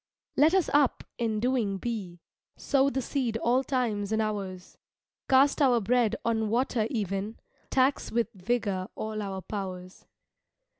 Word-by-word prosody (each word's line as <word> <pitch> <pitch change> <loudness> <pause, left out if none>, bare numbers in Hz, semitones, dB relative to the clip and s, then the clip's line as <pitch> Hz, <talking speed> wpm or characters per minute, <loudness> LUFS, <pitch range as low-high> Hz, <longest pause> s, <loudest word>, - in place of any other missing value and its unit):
Let 310 +6 +5
us 375 -4 +3
up 285 -3 +3 0.2
and 225 -2 0
doing 235 -5 0
be, 190 -6 -5 0.4
Sow 275 0 +2
the 265 -2 -2
seed 240 -4 -1
all 245 +3 +2
times 225 -7 -1
and 220 - +1
hours; 195 -4 -4 0.5
Cast 275 +3 +4
our 250 -4 +5
bread 230 +1 +2
on 220 -2 +1
water 235 -1 +1
even, 205 -2 -3 0.3
Tax 265 +1 +1
with 235 0 0
vigor 200 -2 -1
all 215 0 -4
our 195 -2 -4
powers. 185 -2 -6
225 Hz, 140 wpm, -28 LUFS, 200-255 Hz, 0.5 s, Let